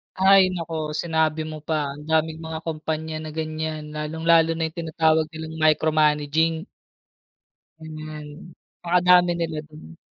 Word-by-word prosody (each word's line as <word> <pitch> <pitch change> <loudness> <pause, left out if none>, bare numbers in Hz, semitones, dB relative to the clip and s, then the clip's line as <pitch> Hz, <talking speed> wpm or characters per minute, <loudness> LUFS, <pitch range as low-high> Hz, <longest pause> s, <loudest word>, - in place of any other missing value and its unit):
Ay, 190 -1 +5
naku 160 -3 -4
sinabi 160 -1 0
mo 155 0 -6
pa, 150 -1 -2
ang 150 - -11
daming 160 0 +1
mga 160 0 -6
kumpanya 160 0 -4
na 155 -1 -7
ganyan, 155 -1 -4
lalong 150 +1 -5
lalo 165 -1 +6
na 160 0 -2
yung 165 - -24
tinatawag 160 -1 +2
nilang 160 0 -7
micromanaging. 155 +1 +2 1.1
Hmm, 155 0 -9 0.3
napakadami 180 0 +4
nila 165 -2 -3
dun. 115 - -14
160 Hz, 130 wpm, -23 LUFS, 155-165 Hz, 1.1 s, lalo